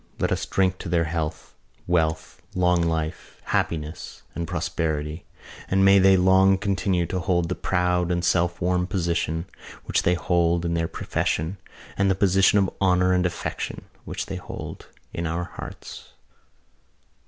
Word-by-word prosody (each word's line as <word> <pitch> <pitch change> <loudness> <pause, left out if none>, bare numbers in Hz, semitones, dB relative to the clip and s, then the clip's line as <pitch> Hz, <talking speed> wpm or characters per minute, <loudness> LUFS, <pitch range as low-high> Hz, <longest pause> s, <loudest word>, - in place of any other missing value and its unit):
Let - - 0
us - - -1
drink 95 -1 +1
to 95 - -6
their 85 -1 +2
health, 80 -1 -4 0.3
wealth, 80 -2 0
long 90 -1 +3
life, 80 -2 -3
happiness 80 0 -3
and 85 -1 -4
prosperity 80 -2 -2 0.4
and 95 +1 +3
may 100 0 +7
they 95 0 +6
long 95 +1 +5
continue 95 -2 0
to 90 +2 -3
hold 85 -2 0
the - - 0
proud 90 -1 0
and 85 0 0
self 85 0 +1
won 90 0 +1
position 85 -3 -1 0.4
which - - +1
they 90 - +2
hold 85 +1 +1
in 85 - 0
their 85 -1 0
profession 80 +2 -2 0.4
and 100 0 +3
the 95 - +3
position 95 +1 +4
of 95 -2 +2
honour 90 -1 +3
and 90 0 +3
affection 85 - -5 0.2
which - - -4
they - - -5
hold - - -8 0.3
in 85 0 -2
our 85 +2 -2
hearts." - - -9
90 Hz, 155 wpm, -24 LUFS, 85-95 Hz, 0.4 s, may